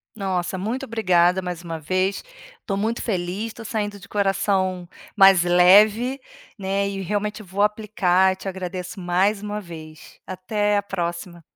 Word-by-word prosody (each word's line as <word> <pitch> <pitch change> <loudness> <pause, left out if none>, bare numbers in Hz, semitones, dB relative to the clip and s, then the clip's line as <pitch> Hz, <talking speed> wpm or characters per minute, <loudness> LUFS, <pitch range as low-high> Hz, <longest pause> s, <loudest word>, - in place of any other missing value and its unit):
Nossa, 190 -3 -2
muito 235 +8 -3
obrigada 185 -6 +2
mais 180 -2 -6
uma 165 -2 -6
vez, 185 +5 -1 0.4
tô 195 - -1
muito 220 +4 -1
feliz, 195 +2 -3
tô 230 - -10
saindo 205 -2 -3
de 190 - -14
coração 195 -2 0 0.3
mais 195 -3 +7
leve, 205 +9 +5 0.4
né, 195 +1 -1
e 195 -1 -4
realmente 210 +3 -3
vou 195 +1 -2
aplicar, 190 -3 +2
te 195 - -12
agradeço 185 0 -5
mais 190 +4 +1
um 210 0 -4
vez. 160 -5 -11
Até 205 +3 -1
a 205 - +1
próxima. 175 -2 -5
195 Hz, 145 wpm, -22 LUFS, 180-210 Hz, 0.4 s, mais